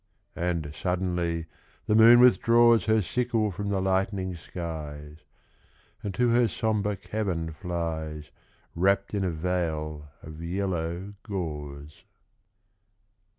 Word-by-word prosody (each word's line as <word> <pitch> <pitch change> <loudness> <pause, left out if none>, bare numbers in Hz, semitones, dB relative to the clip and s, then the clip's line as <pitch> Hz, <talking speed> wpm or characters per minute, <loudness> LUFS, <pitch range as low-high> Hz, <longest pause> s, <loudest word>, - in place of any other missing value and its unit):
And 85 -4 -2
suddenly 90 -2 -1 0.4
the - - +1
moon 115 +2 +8
withdraws 120 -1 +5
Her 110 -1 +3
sickle 115 0 0
from 100 +3 -4
the 100 -1 0
lightening 95 0 0
skies, 75 -3 -7 0.8
And 100 - -3
to 125 -1 +2
her 120 0 +4
sombre 105 -1 -1
cavern 85 -6 -3
flies, 80 -3 -4 0.4
Wrapped 100 +3 +1
in 100 -2 0
a 95 - +1
veil 80 -3 -2 0.2
of 80 +1 -9
yellow 90 +1 -3
gauze. 75 -7 -6
90 Hz, 110 wpm, -27 LUFS, 80-105 Hz, 0.8 s, moon